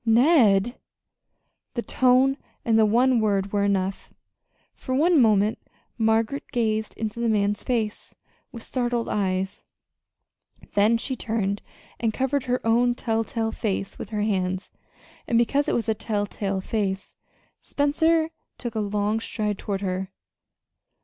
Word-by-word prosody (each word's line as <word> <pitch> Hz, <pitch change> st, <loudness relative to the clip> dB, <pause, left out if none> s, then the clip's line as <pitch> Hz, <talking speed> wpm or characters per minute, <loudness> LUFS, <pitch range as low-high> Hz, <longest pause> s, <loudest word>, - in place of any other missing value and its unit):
"Ned!" 235 Hz, -, +4 dB, 1.0 s
The 235 Hz, -, -2 dB
tone 260 Hz, +1 st, +3 dB, 0.3 s
and 225 Hz, -1 st, +3 dB
the 215 Hz, -, +5 dB
one 245 Hz, +3 st, +3 dB
word 200 Hz, -2 st, 0 dB
were 200 Hz, -1 st, +2 dB
enough. 195 Hz, -1 st, -1 dB, 0.6 s
For 260 Hz, -, -4 dB
one 320 Hz, +1 st, +4 dB
moment 215 Hz, -1 st, +3 dB, 0.4 s
Margaret 225 Hz, +4 st, +1 dB
gazed 220 Hz, -3 st, -1 dB
into 220 Hz, +1 st, -4 dB
the 235 Hz, -1 st, +1 dB
man's 205 Hz, -1 st, +1 dB
face 225 Hz, -5 st, -3 dB, 0.4 s
with 230 Hz, -3 st, -9 dB
startled 240 Hz, -2 st, -1 dB
eyes; 190 Hz, -1 st, -1 dB, 1.1 s
then 210 Hz, +3 st, +4 dB
she 260 Hz, +3 st, -4 dB
turned 210 Hz, -4 st, -2 dB, 0.4 s
and 225 Hz, -2 st, 0 dB
covered 265 Hz, +1 st, 0 dB
her 250 Hz, -1 st, -1 dB
own 240 Hz, +2 st, +3 dB
telltale 225 Hz, -1 st, -1 dB
face 195 Hz, -3 st, -3 dB
with -, -, -6 dB
her 210 Hz, -2 st, -1 dB
hands 185 Hz, -2 st, -1 dB, 0.6 s
and 235 Hz, -6 st, +2 dB
because 280 Hz, +5 st, +2 dB
it -, -, +1 dB
was 230 Hz, -, -1 dB
a 220 Hz, -, +3 dB
telltale 205 Hz, -2 st, -2 dB
face, 195 Hz, -2 st, -2 dB, 0.5 s
Spencer 320 Hz, +3 st, +1 dB, 0.3 s
took 240 Hz, -3 st, -5 dB
a 220 Hz, -, -2 dB
long 210 Hz, +1 st, 0 dB
stride 210 Hz, -3 st, -3 dB
toward 200 Hz, -1 st, -3 dB
her. 185 Hz, -1 st, -2 dB
220 Hz, 135 wpm, -25 LUFS, 205-245 Hz, 1.1 s, the